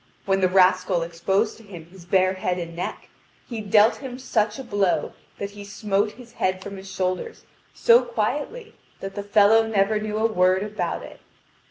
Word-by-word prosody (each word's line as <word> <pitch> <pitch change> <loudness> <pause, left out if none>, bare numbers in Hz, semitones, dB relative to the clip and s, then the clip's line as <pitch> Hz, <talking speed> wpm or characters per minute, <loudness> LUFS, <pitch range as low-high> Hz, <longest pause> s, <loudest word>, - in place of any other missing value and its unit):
When 195 0 +2
the 185 - +4
rascal 185 -1 +3
exposed 190 +6 -1
to 225 - -16
him 180 -6 -11
his 175 0 -16
bare 185 +1 +3
head 185 -1 -2
and 170 -1 -6
neck, 175 - -5 0.4
he 230 -3 -5
dealt 210 +2 +4
him 260 -3 -7
such 215 -5 0
a 270 - -6
blow 205 -6 0 0.2
that 200 0 -5
he 205 0 -10
smote 200 +1 -1
his 240 0 -14
head 185 -4 -1
from 200 -1 -7
his 190 0 -10
shoulders 185 - -3 0.3
so 475 0 +6
quietly 480 -1 -3 0.3
that 195 0 -6
the 205 - -4
fellow 205 +2 +5
never 210 0 +1
knew 215 0 -3
a 220 - +1
word 185 -3 +2
about 210 0 -3
it. - - -12
200 Hz, 185 wpm, -24 LUFS, 185-220 Hz, 0.4 s, so